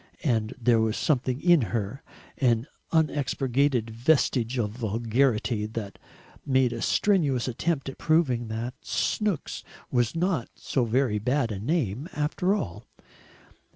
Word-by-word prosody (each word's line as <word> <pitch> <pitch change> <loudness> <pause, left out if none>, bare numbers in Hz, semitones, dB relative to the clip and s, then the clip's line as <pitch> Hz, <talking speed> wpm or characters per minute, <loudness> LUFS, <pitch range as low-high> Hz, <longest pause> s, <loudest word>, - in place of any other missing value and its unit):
And 115 -4 0
there 120 -1 +4
was 110 0 0
something 130 -3 0
in 175 -2 +5
her, 110 +4 -3 0.4
an 120 -3 +2 0.3
unexpurgated 140 -5 +1
vestige 125 0 +1
of 105 -4 0
vulgarity, 115 0 0
that 110 -2 -6 0.4
made 130 -3 +2
a 115 - -5
strenuous 150 - +2
attempt 140 +4 -1
at 135 - -7
proving 140 -8 +2
that 115 +3 -4
Snooks 210 -8 -1 0.3
was 120 +2 +1
not 170 -6 0
so 130 -3 -1
very 115 -2 +1
bad 125 +2 0
a 100 - -4
name 135 - -1
after 170 +6 0
all. 90 - -5
125 Hz, 125 wpm, -27 LUFS, 115-145 Hz, 0.4 s, in